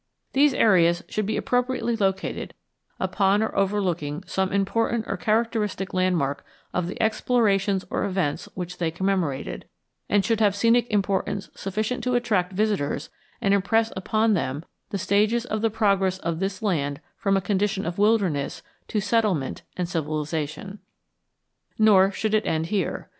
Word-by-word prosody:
These 280 0 +4
areas 175 -5 +4
should 215 -2 -2
be 215 - -1
appropriately 245 -1 0
located 195 -3 -2 0.4
upon 200 +1 +2
or 220 - -3
overlooking 185 -6 0
some 190 0 -1
important 220 +3 0
or - - -1
characteristic 215 -3 -1
landmark 180 -7 0 0.3
of 180 -1 -1
the 185 - -6
explorations 210 -4 +1
or - - 0
events 185 -7 -2
which 180 -1 -6
they 170 -2 +1
commemorated, 175 -5 -2 0.4
and 205 -1 +3
should 225 -2 +1
have 205 -3 +3
scenic 230 +3 +3
importance 200 0 -1
sufficient 215 +5 -3
to 250 -1 +1
attract 205 -7 +1
visitors 185 -8 -1 0.3
and 200 -3 +3
impress 220 +3 +2
upon 215 +3 +1
them 150 -3 -2 0.2
the 200 - -2
stages 215 +5 +2
of 215 -3 -2
the 225 - +2
progress 195 -4 +1
of 170 -3 -3
this 195 +1 -3
land 145 -8 0 0.2
from 195 -1 +1
a - - +3
condition 195 +1 0
of 170 +3 -4
wilderness 200 -10 +1 0.2
to 215 - -1
settlement 200 - 0 0.2
and 180 -1 -1
civilization. 155 +3 -3 1.0
Nor 200 -3 +6
should 215 +2 -2
it 215 0 +2
end 160 0 0
here. 200 - -1
195 Hz, 145 wpm, -25 LUFS, 180-215 Hz, 1.0 s, Nor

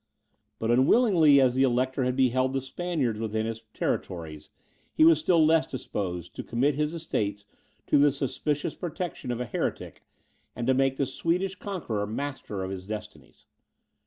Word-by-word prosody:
But 115 +1 -1
unwillingly 155 - +5
as 130 -2 +4
the 130 - +1
Elector 130 +1 +1
had 125 0 0
beheld 130 0 +2
the 135 - +1
Spaniards 135 -5 -2
within 110 0 -2
his 115 0 -4
territories, 80 -4 -4 0.4
he 155 - +4
was 165 -2 +6
still 165 0 +4
less 160 +1 +3
disposed 90 -8 -5
to - - -5
commit 130 +5 +1
his 150 +3 -1
estates 105 -11 -3 0.4
to - - +3
the 145 0 +5
suspicious 145 +2 -2
protection 175 -5 -5
of 120 -1 -2
a 125 - -2
heretic, 115 - -4 0.5
and 120 - -3
to 130 - +3
make 135 0 +1
the 140 - +1
Swedish 175 +8 -1
conqueror 165 - -4
master 110 -4 -4
of 95 - -4
his 95 0 -7
destinies. 105 -10 -9
130 Hz, 160 wpm, -27 LUFS, 110-150 Hz, 0.5 s, was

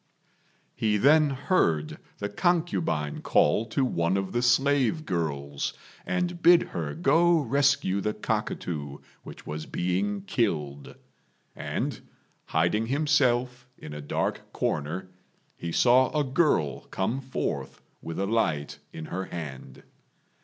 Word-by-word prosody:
He 105 -1 +1
then 150 +6 +5
heard 130 - 0 0.2
the 100 - -3
concubine 160 - 0
call 105 +10 +3
to 130 +4 0
one 85 -5 0
of 95 -1 -2
the 120 - 0
slave 135 +4 +2
girls, 70 -5 -2 0.3
and 180 -1 -1
bid 170 0 +7
her 75 -4 -4
go 165 +4 +4
rescue 140 -7 +2
the 105 +2 -1
cockatoo 70 -5 -3 0.2
which - - -11
was 75 +1 -5
being 95 +3 -1
killed; 75 - -2 0.6
and, - - -3 0.5
hiding 85 +8 +1
himself 130 -3 +1
in 75 - -9
a 75 - -6
dark 75 - -3
corner, 85 +6 -2 0.4
he 85 - -5
saw 125 +6 +5
a - - +2
girl 130 - +1
come 115 +8 -2
forth 130 0 -4 0.2
with 80 - -6
a 100 - +1
light 80 -9 -1
in 80 - -7
her 95 +4 -4
hand. 75 -6 -8
105 Hz, 125 wpm, -27 LUFS, -, 0.6 s, bid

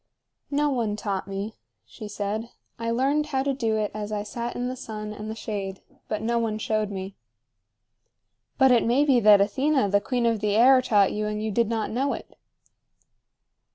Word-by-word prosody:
"No 290 +1 +1
one 230 -5 -1
taught 200 -3 -3
me," 200 +3 -4 0.3
she 215 - -9
said. 210 +3 -3 0.3
"I 230 0 -2
learned 275 +6 +1
how 265 -3 0
to 275 0 0
do 225 -5 0
it 210 -1 -1
as 210 0 -5
I 210 -1 -2
sat 235 +3 -5
in 245 0 -2
the 255 - -3
sun 215 -4 -6
and 215 +1 -7
the 220 - -4
shade; 200 -3 -5 0.2
but 215 0 -3
no 235 +1 +1
one 220 -2 -1
showed 215 -1 -1
me." 195 -1 -6 1.4
"But 265 -1 +5
it 240 -2 +5
may 255 +5 +3
be 265 -4 +4
that 210 -2 +7
Athena, 260 +3 +1
the 200 +1 +3
queen 245 +2 -1
of 230 -2 +2
the 205 0 0
air, 255 +3 +6
taught 205 -6 +3
you, 210 0 -2
and 210 0 -3
you 220 - -2
did 230 +1 +1
not 225 -2 -2
know 270 +5 0
it." - - -9
220 Hz, 195 wpm, -25 LUFS, 210-250 Hz, 1.4 s, that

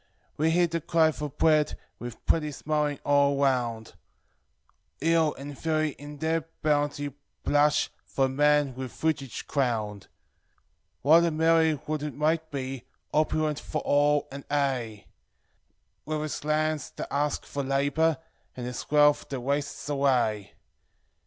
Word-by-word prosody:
We 155 +2 +2
hear 175 +2 +4
the 165 0 -2
cry 160 0 +3
for 150 -1 -5
bread 155 +2 +2 0.2
with 120 -1 -8
plenty 155 -2 +2
smil 150 +1 -1
ng 140 - -12
all 140 -1 +3
around; 120 -5 0 1.1
Hill 165 -1 +2
and 140 +1 -8
valley 155 0 0
in 145 +1 -10
their 160 +1 0 0.2
bounty 145 -1 0 0.3
blush 145 +1 +3
for 135 -1 0
Man 145 0 +3
with 130 -1 -6
fruil 155 -4 -1 0.2
crowned. 110 -7 -1 1.0
What 160 +5 +6
a - - +2
merry 160 0 +3
world 150 +1 -4
it 150 0 -4
might 160 +2 0
be, 135 -3 -5 0.3
opulent 155 0 +1
foi - - -5
all, 145 0 +3
and 140 0 -7
aye, 130 -7 -1 1.0
With 155 0 -2
its 155 - -4
lands 155 -1 0
that - - -6
ask 145 +1 0
for 140 - -4
labor, 145 +3 +1 0.4
and 125 - -4
ts 125 0 -6
wealth 150 0 +4
that 135 -2 -4
wastes 140 +3 -2
away! 125 -8 +1
145 Hz, 140 wpm, -27 LUFS, 135-155 Hz, 1.1 s, What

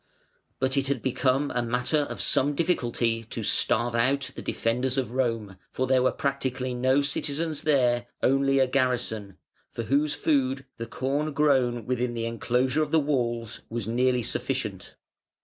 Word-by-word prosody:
But 130 +1 0
it 135 0 +1
had 135 -4 -1
become 130 +2 +1
a 125 - 0
matter 125 +6 0
of 145 - -3
some 145 +2 +2
difficulty 120 -8 0
to 115 0 -5
starve 120 +3 +2
out 130 +4 +1
the - - -7
defenders 125 +3 -1
of 130 -3 -1
Rome, 115 -6 -1
for 130 - -1
there 130 0 +3
were 130 - +3
practically 130 -2 -2
no 130 +3 +2
citizens 150 +2 -2
there, 120 -5 +2 0.2
only 135 +1 +3
a 135 - +5
garrison, 125 -7 -1 0.3
for 115 - -4
whose 145 +5 +1
food 135 -2 0
the 115 - -5
corn 140 +5 -2
grown 130 -6 +2
within 125 0 -1
the 115 0 -2
enclosure 125 +5 0
of 155 - 0
the 160 - +4
walls 120 -6 -1
was 115 -2 -4
nearly 125 +1 +1
sufficient. - - -3
130 Hz, 160 wpm, -26 LUFS, 120-140 Hz, 0.3 s, a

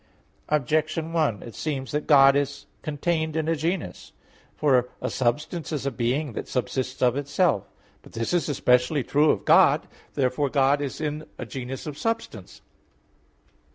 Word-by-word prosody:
Objection 155 +3 0
1: 150 - 0
It 115 - -9
seems 135 -4 -4
that 150 0 -2
God 140 -2 +7
is 140 0 -1 0.2
contained 160 +1 -1
in 160 -1 -1
a 165 - +2
genus. 160 - -3 0.4
For 130 -4 +2
a - - -3
substance 150 +8 -1
is 145 -3 -3
a 140 - 0
being 130 +3 -1
that - - -5
subsists 130 +2 -2
of 125 0 +3
itself. 140 - 0 0.3
But - - -17
this 115 +8 -2
is 175 -3 +1
especially 125 +1 +2
true 150 +4 +3
of - - +1
God. - - +5 0.3
Therefore 135 +1 +1
God 140 +1 +2
is 140 -2 -4
in 155 0 -3
a 130 - -5
genus 130 +2 -6
of 150 -2 -6
substance. 225 0 -4
145 Hz, 155 wpm, -25 LUFS, 130-155 Hz, 0.4 s, God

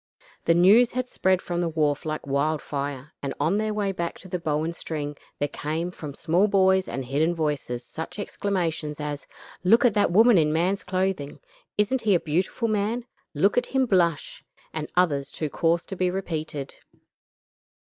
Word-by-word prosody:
The 165 - +4
news 210 +8 +6
had 255 0 -1
spread 185 -5 +1
from 175 0 -2
the 170 - 0
wharf 155 -1 0
like 155 0 -3
wildfire, 140 -1 -2
and 140 - -3
on 165 +8 +2
their 215 0 0
way 205 -2 0
back 170 -2 -4
to 185 - -11
the 180 0 -3
Bow 155 -2 0
and 165 +1 -3
String, 150 -3 -4 0.2
there 145 - 0
came 160 +4 -3
from 150 -5 -8
small 180 +6 +2
boys 190 -1 +3
and 135 -1 -4
hidden 155 +7 +1
voices 145 -6 -2
such 160 +6 -7
exclamations 165 -7 -2
as: 145 -1 -4 0.4
"Look 225 +7 +5
at 235 - +5
the 205 - +3
woman 220 +2 +6
in 150 -1 +2
man's 180 +5 +1
clothing;" 185 -6 -2 0.4
"Isn't 220 +5 +2
he 205 -4 +3
a - - +3
beautiful 180 +10 -1
man?" 215 +3 -1 0.3
"Look 200 +10 +4
at - - -6
him 265 -1 +1
blush;" 170 - +1 0.3
and 155 -1 -4
others 145 -6 +2
too 155 -3 -4
coarse 165 0 +1
to 195 - -6
be 185 0 +1
repeated. 160 -6 -4
170 Hz, 175 wpm, -25 LUFS, 150-195 Hz, 0.4 s, news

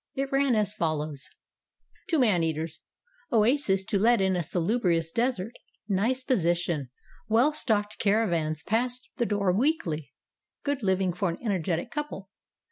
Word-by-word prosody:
It 275 0 -2
ran 275 -2 +3
as 210 -1 +1
follows: 155 -6 -2 0.8
"To 330 - +2
MAN 215 - +3
EATERS. 160 0 -2 0.5
Oases 215 -4 +2
to 200 - 0
let 235 +3 +4
in 190 -1 +2
a 175 - 0
salubrious 170 -1 0
desert. 235 -2 -1 0.3
Nice 225 +6 +1
position. 175 - 0 0.4
Well 240 +8 +4
stocked 215 -7 -1
caravans 170 -8 +1
pass 245 +3 0 0.2
the 235 - +1
door 200 -3 +1
weekly. 195 - 0 0.5
Good 285 -2 -1
living 190 -2 +1
for 185 +1 -1
an 170 - -4
energetic 185 0 -1
couple. 295 -11 -5
200 Hz, 135 wpm, -27 LUFS, 170-240 Hz, 0.8 s, let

